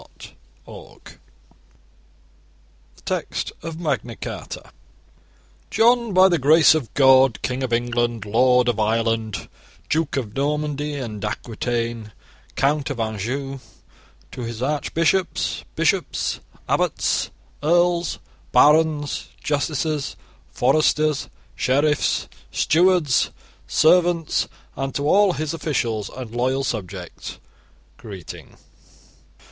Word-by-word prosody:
The -, -, -12 dB, 2.1 s
Text -, -, -3 dB
of 165 Hz, 0 st, -6 dB
Magna 135 Hz, -8 st, -2 dB
Carta -, -, -7 dB, 1.0 s
JOHN, 235 Hz, 0 st, +3 dB
by 185 Hz, 0 st, +6 dB
the 175 Hz, -3 st, +2 dB
grace 155 Hz, +4 st, +6 dB
of 145 Hz, -9 st, -2 dB
God 130 Hz, -3 st, +5 dB
King 130 Hz, +1 st, -2 dB
of 130 Hz, -2 st, -2 dB
England, 120 Hz, -2 st, 0 dB
Lord 125 Hz, +3 st, +3 dB
of 120 Hz, -3 st, 0 dB
Ireland, 110 Hz, 0 st, 0 dB, 0.4 s
Duke 155 Hz, -2 st, 0 dB
of 110 Hz, -6 st, -3 dB
Normandy 150 Hz, +1 st, -1 dB
and 115 Hz, -7 st, -5 dB
Aquitaine, 115 Hz, +2 st, -2 dB
and 105 Hz, -, -14 dB, 0.4 s
Count 145 Hz, +1 st, +1 dB
of 135 Hz, -4 st, -4 dB
Anjou, 120 Hz, +6 st, -3 dB, 0.7 s
to -, -, -7 dB
his 115 Hz, 0 st, -5 dB
archbishops, 165 Hz, +5 st, 0 dB
bishops, -, -, 0 dB, 0.3 s
abbots, -, -, 0 dB, 0.3 s
earls, 175 Hz, +2 st, +2 dB, 0.3 s
barons, 150 Hz, -1 st, +3 dB
justices, 150 Hz, 0 st, -1 dB, 0.4 s
foresters, 155 Hz, +2 st, +2 dB, 0.2 s
sheriffs, 145 Hz, +3 st, +1 dB, 0.2 s
stewards, 170 Hz, -4 st, +3 dB, 0.4 s
servants, 170 Hz, 0 st, +3 dB, 0.3 s
and 135 Hz, 0 st, -4 dB
to 140 Hz, +1 st, -1 dB
all 195 Hz, +2 st, +4 dB
his 155 Hz, -1 st, -3 dB
officials 120 Hz, -10 st, -2 dB
and 125 Hz, -4 st, -8 dB
loyal 130 Hz, +3 st, 0 dB
subjects, 95 Hz, -7 st, -5 dB, 0.6 s
Greeting. 95 Hz, -7 st, -10 dB
135 Hz, 95 wpm, -22 LUFS, 120-155 Hz, 2.1 s, by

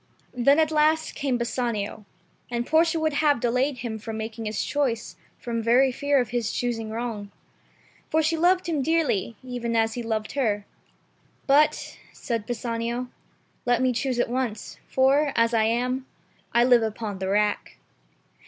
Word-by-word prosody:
Then 260 Hz, +3 st, +4 dB
at 315 Hz, -1 st, +3 dB
last 310 Hz, +1 st, +2 dB
came 275 Hz, -4 st, -1 dB
Bassanio, 235 Hz, -3 st, -3 dB, 0.4 s
and 240 Hz, 0 st, -2 dB
Portia 325 Hz, +2 st, +3 dB
would 315 Hz, -1 st, 0 dB
have 290 Hz, -2 st, +3 dB
delayed 250 Hz, +4 st, +1 dB
him 230 Hz, -3 st, -5 dB
from 220 Hz, +1 st, -6 dB
making 220 Hz, +1 st, -5 dB
his 215 Hz, 0 st, -2 dB
choice 265 Hz, -6 st, -1 dB, 0.2 s
from 230 Hz, -1 st, -3 dB
very 250 Hz, +4 st, +4 dB
fear 285 Hz, +2 st, +1 dB
of 245 Hz, -3 st, -1 dB
his 235 Hz, -2 st, -1 dB
choosing 230 Hz, -3 st, -2 dB
wrong. 220 Hz, -3 st, -4 dB, 0.8 s
For 315 Hz, 0 st, +2 dB
she 320 Hz, +2 st, +1 dB
loved 360 Hz, +3 st, +2 dB
him 315 Hz, -4 st, 0 dB
dearly, 285 Hz, -, 0 dB
even 245 Hz, -2 st, -3 dB
as 225 Hz, 0 st, +2 dB
he 245 Hz, -, -4 dB
loved 220 Hz, -2 st, -2 dB
her. 210 Hz, -7 st, 0 dB, 0.8 s
"But," 295 Hz, +2 st, +2 dB
said 230 Hz, -3 st, -4 dB
Bassanio, 235 Hz, +1 st, -3 dB, 0.6 s
"let 245 Hz, -1 st, +3 dB
me 255 Hz, 0 st, +2 dB
choose 250 Hz, +1 st, -1 dB
at -, -, +2 dB
once, 240 Hz, -3 st, -3 dB
for, 275 Hz, +2 st, +3 dB
as 230 Hz, 0 st, +3 dB
I 220 Hz, -1 st, +3 dB
am, 250 Hz, +3 st, -1 dB, 0.4 s
I 235 Hz, -, +4 dB
live 245 Hz, -1 st, +5 dB
upon 220 Hz, -2 st, -3 dB
the 190 Hz, -, -3 dB
rack." 210 Hz, +1 st, 0 dB
245 Hz, 160 wpm, -25 LUFS, 225-280 Hz, 0.8 s, live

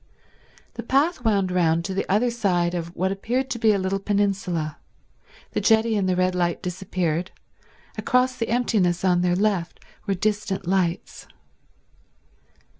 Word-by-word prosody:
The 235 Hz, -, -6 dB
path 275 Hz, +4 st, +1 dB
wound 200 Hz, -5 st, +1 dB
round 170 Hz, -2 st, +2 dB
to 190 Hz, -, -3 dB
the 195 Hz, -, -3 dB
other 230 Hz, +5 st, +2 dB
side 180 Hz, -7 st, 0 dB
of 170 Hz, 0 st, -5 dB
what 190 Hz, +1 st, 0 dB
appeared 250 Hz, +7 st, -2 dB
to 235 Hz, -, -3 dB
be 220 Hz, -1 st, +4 dB
a 205 Hz, -, +2 dB
little 190 Hz, +1 st, -1 dB
peninsula; 195 Hz, -6 st, -1 dB, 0.7 s
the -, -, -1 dB
jetty 220 Hz, 0 st, +3 dB
and 195 Hz, -2 st, +1 dB
the 185 Hz, -, +2 dB
red 185 Hz, 0 st, +1 dB
light 175 Hz, 0 st, -1 dB
disappeared; 180 Hz, -2 st, -2 dB, 0.7 s
across 250 Hz, 0 st, +2 dB
the 230 Hz, -, -3 dB
emptiness 200 Hz, -7 st, +1 dB
on 180 Hz, -1 st, +3 dB
their 175 Hz, 0 st, +2 dB
left 190 Hz, -3 st, 0 dB, 0.3 s
were 195 Hz, -, +1 dB
distant 205 Hz, -1 st, -2 dB
lights. 180 Hz, -2 st, -1 dB
195 Hz, 150 wpm, -24 LUFS, 180-220 Hz, 0.7 s, be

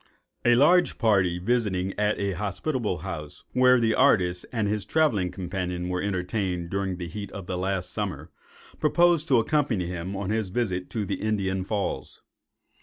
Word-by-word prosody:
A 120 Hz, 0 st, +5 dB
large 175 Hz, +8 st, +4 dB
party 100 Hz, -6 st, +2 dB
visiting 95 Hz, -2 st, 0 dB
at 105 Hz, 0 st, +1 dB
a 100 Hz, -1 st, -1 dB
hospitable 105 Hz, -, -2 dB
house, 75 Hz, -5 st, -6 dB
where 125 Hz, 0 st, +5 dB
the 115 Hz, -1 st, +2 dB
artist 90 Hz, -10 st, +3 dB
and 110 Hz, -4 st, 0 dB
his 105 Hz, 0 st, -1 dB
travelling 120 Hz, -, +1 dB
companion 90 Hz, -1 st, -4 dB
were 90 Hz, 0 st, -1 dB
entertained 90 Hz, -2 st, -2 dB
during 95 Hz, -2 st, -1 dB
the 90 Hz, -1 st, -5 dB
heat 100 Hz, +4 st, -7 dB
of 95 Hz, -, -7 dB
the 90 Hz, -, -3 dB
last 90 Hz, 0 st, -2 dB
summer, -, -, -4 dB, 0.5 s
proposed 170 Hz, 0 st, +3 dB
to 130 Hz, -, +4 dB
accompany 115 Hz, -, +1 dB
him 90 Hz, +2 st, -4 dB
on 100 Hz, 0 st, -3 dB
his 110 Hz, -3 st, -1 dB
visit 95 Hz, -4 st, -2 dB
to 110 Hz, -3 st, -2 dB
the -, -, -3 dB
Indian 95 Hz, -3 st, 0 dB
Falls. 100 Hz, +1 st, -3 dB
100 Hz, 165 wpm, -26 LUFS, 90-115 Hz, 0.5 s, A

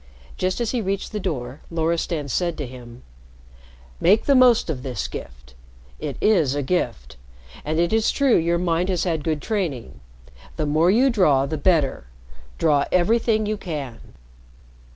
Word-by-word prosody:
Just 185 Hz, +3 st, -1 dB
as 235 Hz, -2 st, -1 dB
he 245 Hz, -, -1 dB
reached 195 Hz, 0 st, -3 dB
the 210 Hz, -, -3 dB
door, 135 Hz, -8 st, -4 dB
Loristan 165 Hz, -2 st, -1 dB
said 170 Hz, +4 st, -1 dB
to 145 Hz, -, -4 dB
him: 120 Hz, -1 st, -12 dB, 1.0 s
"Make 205 Hz, +5 st, +3 dB
the 280 Hz, -, +4 dB
most 250 Hz, -3 st, +5 dB
of 150 Hz, -6 st, -3 dB
this 130 Hz, -2 st, -4 dB
gift. -, -, -10 dB, 0.5 s
It -, -, -5 dB
is 165 Hz, -11 st, +2 dB
a 145 Hz, -, -1 dB
gift. 120 Hz, -, -2 dB, 0.5 s
And 155 Hz, +1 st, -2 dB
it 170 Hz, +4 st, +1 dB
is 220 Hz, 0 st, +2 dB
true 275 Hz, -3 st, +3 dB
your 170 Hz, +1 st, +2 dB
mind 175 Hz, +1 st, 0 dB
has 180 Hz, -3 st, 0 dB
had 165 Hz, -5 st, -1 dB
good 155 Hz, -3 st, -2 dB
training. 150 Hz, -, -3 dB, 0.6 s
The 155 Hz, -, -2 dB
more 155 Hz, +4 st, +2 dB
you 250 Hz, +7 st, +4 dB
draw, 150 Hz, -, +3 dB
the 155 Hz, -, -3 dB
better. 150 Hz, -, +1 dB, 0.5 s
Draw 145 Hz, -3 st, +2 dB
everything 215 Hz, +4 st, +2 dB
you 215 Hz, 0 st, -2 dB
can." 145 Hz, -, -7 dB
165 Hz, 160 wpm, -22 LUFS, 140-200 Hz, 1.0 s, most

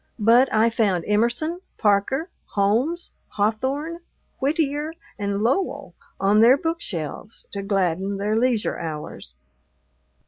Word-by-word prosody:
But 235 Hz, +4 st, +5 dB
I 225 Hz, +2 st, +3 dB
found 200 Hz, -7 st, +1 dB
Emerson, 240 Hz, +11 st, 0 dB, 0.2 s
Parker, 225 Hz, -, +1 dB, 0.2 s
Holmes, 235 Hz, -, +1 dB, 0.2 s
Hawthorne, 265 Hz, +11 st, -1 dB, 0.4 s
Whittier, 295 Hz, +1 st, 0 dB, 0.3 s
and 200 Hz, 0 st, -1 dB
Lowell 285 Hz, -, 0 dB, 0.3 s
on 200 Hz, +2 st, +4 dB
their 245 Hz, +4 st, +7 dB
bookshelves 220 Hz, -, -4 dB
to 200 Hz, -, -4 dB
gladden 195 Hz, -1 st, 0 dB
their 205 Hz, +2 st, 0 dB
leisure 235 Hz, -1 st, +1 dB
hours. 150 Hz, -, -7 dB
225 Hz, 105 wpm, -23 LUFS, 200-280 Hz, 0.4 s, their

